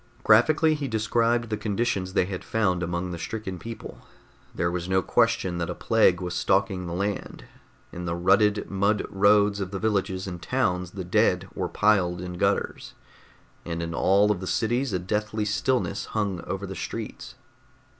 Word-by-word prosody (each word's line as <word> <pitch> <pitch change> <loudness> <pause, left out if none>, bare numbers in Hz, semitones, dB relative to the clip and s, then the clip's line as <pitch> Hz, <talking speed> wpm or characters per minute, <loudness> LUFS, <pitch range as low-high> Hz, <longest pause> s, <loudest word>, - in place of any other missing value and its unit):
Graphically, 155 +9 +5
he 145 -2 -3
described 115 +1 +1
the 105 - 0
conditions 105 -3 -1
they 90 - +3
had 95 -1 -5
found 95 -6 0
among 90 +1 -2
the 85 - -5
stricken 95 0 -5
people. 115 +1 -8 0.6
There 85 0 0
was 90 0 -4
no 95 -1 +2
question 90 -2 +1
that 85 0 -2
a 90 - -3
plague 110 -6 +3
was 90 -1 -3
stalking 95 -1 +1
the 85 - -4
land. 100 +2 -3 0.5
In 90 0 -6
the 85 -1 -2
rutted 100 +4 +3
mud 100 +2 +1
roads 100 +1 +4
of 95 -2 -3
the 100 - -4
villages 95 -3 -1
and 90 -3 -6
towns 90 -4 -1
the 95 -2 -5
dead 90 - +2
were - - -3
piled 95 -5 +2
in 90 -1 -6
gutters, - - -1 0.7
and 85 -1 -4
in 85 0 -4
all 100 +4 +3
of 100 - -1
the 95 - -6
cities 120 +7 0
a 95 - +1
deathly 105 +3 -2
stillness 105 0 0
hung 100 -5 -2
over 95 +1 -4
the 95 - -6
streets. - - -6
100 Hz, 175 wpm, -26 LUFS, 90-110 Hz, 0.7 s, Graphically